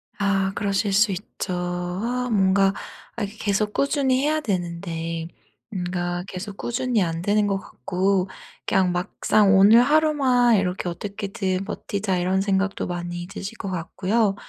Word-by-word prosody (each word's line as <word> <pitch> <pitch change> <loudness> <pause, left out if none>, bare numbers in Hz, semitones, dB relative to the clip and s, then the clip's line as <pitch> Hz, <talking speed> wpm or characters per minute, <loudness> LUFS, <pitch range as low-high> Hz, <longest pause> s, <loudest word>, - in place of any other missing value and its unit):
아 195 -1 +1
그러실 200 0 0
수 210 0 +4
있죠. 185 -1 -5
아 180 +8 -2
뭔가 195 -1 +3 0.4
아 235 - -3
이게 200 +2 -5
계속 210 0 0
꾸준히 275 -2 +1
해야 310 +1 +2
되는데 170 - -3 0.4
뭔가 180 -3 -3
계속 195 +2 -7
꾸준히 240 -2 0
안 165 -1 -2
되는 205 +3 +2
것 195 -1 +1
같고 190 0 -1 0.4
그냥 185 -2 +2
막상 195 +3 +2
'오늘 215 +5 +8
하루만 270 -5 +4
이렇게 180 -1 -1
어떻게든 195 0 -3
버티자.' 195 -2 -2
이런 185 +2 +1
생각도 195 0 0
많이 175 0 -4
드실 200 +3 -7
것 195 - -5
같고요. 195 +4 0
195 Hz, 280 characters per minute, -23 LUFS, 180-215 Hz, 0.4 s, 오늘